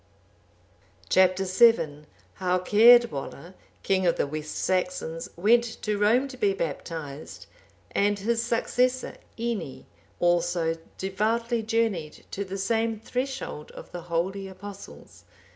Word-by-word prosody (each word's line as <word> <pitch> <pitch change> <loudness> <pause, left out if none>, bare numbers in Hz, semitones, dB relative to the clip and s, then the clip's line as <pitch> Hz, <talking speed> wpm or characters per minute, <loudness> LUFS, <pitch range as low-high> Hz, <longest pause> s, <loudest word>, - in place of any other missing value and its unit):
Chap. 185 -1 +4
VII. 185 -6 +3 0.3
How 185 -1 +1
Caedwalla, 210 - +4 0.3
king 190 -2 +2
of 170 - +3
the - - 0
West 155 +1 -5
Saxons, 185 -4 -2
went 225 +7 +4 0.2
to 210 -1 -1
Rome 235 +6 +3
to 255 - -10
be 200 -4 +1
baptized; 155 -3 -6 0.5
and 205 0 +2
his 230 +3 0
successor 250 +2 0 0.2
Ini, 225 - -4 0.3
also 175 -1 +1 0.2
devoutly 225 +5 0
journeyed 215 -8 -1
to 200 - -3
the 195 0 -6
same 225 +2 0
threshold 250 - -4
of - - -11
the 175 - -6
holy 180 +4 -2
Apostles. 195 +1 -11
195 Hz, 115 wpm, -26 LUFS, 175-230 Hz, 0.5 s, Chap